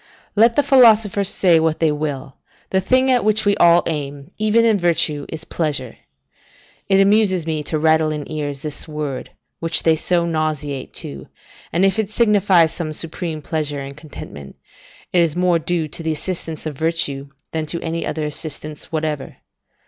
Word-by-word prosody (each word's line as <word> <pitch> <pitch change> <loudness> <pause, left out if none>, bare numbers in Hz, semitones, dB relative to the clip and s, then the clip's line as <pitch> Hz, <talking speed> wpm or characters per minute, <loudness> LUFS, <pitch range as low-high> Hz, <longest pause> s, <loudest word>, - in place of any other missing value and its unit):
Let 230 +2 +5
the 290 - +3
philosophers 220 -7 +5
say 175 -5 +4
what 160 -1 0
they 160 -2 +3
will, 145 -2 -4 0.3
the 190 - +2
thing 260 +6 +3
at 250 -2 +3
which 215 0 +2
we 205 0 +4
all 170 0 +5
aim, 145 0 -4
even 215 +2 +3
in 220 -3 +3
virtue 160 -4 +1
is 160 0 -6
pleasure. 140 -7 -2 0.9
It 195 0 +4
amuses 195 -3 +3
me 160 -2 -2
to 155 - -1
rattle 160 0 +3
in 150 -2 -4
ears 145 -3 -4
this 150 0 -5
word, 150 -4 -5 0.3
which 165 -1 0
they 160 -1 +4
so 170 +2 0
nauseate 155 -4 -2
to 70 -1 -8 0.4
and 175 +4 +2
if 195 +3 +1
it 210 -2 -1
signify 205 -6 +4
some 160 0 -4
supreme 160 -1 -4
pleasure 150 -3 -2
and 135 0 -8
contentment, 140 - -10 0.6
it 175 - +5
is 165 -3 +1
more 180 -1 +2
due 165 0 -1
to 155 - -4
the 160 -1 -1
assistance 165 0 -5
of 155 -2 -4
virtue 145 -3 -2 0.2
than 160 -1 -3
to 170 +3 -2
any 165 0 -3
other 155 0 -3
assistance 150 0 -7
whatever. 155 -4 -3
160 Hz, 170 wpm, -20 LUFS, 150-185 Hz, 0.9 s, Let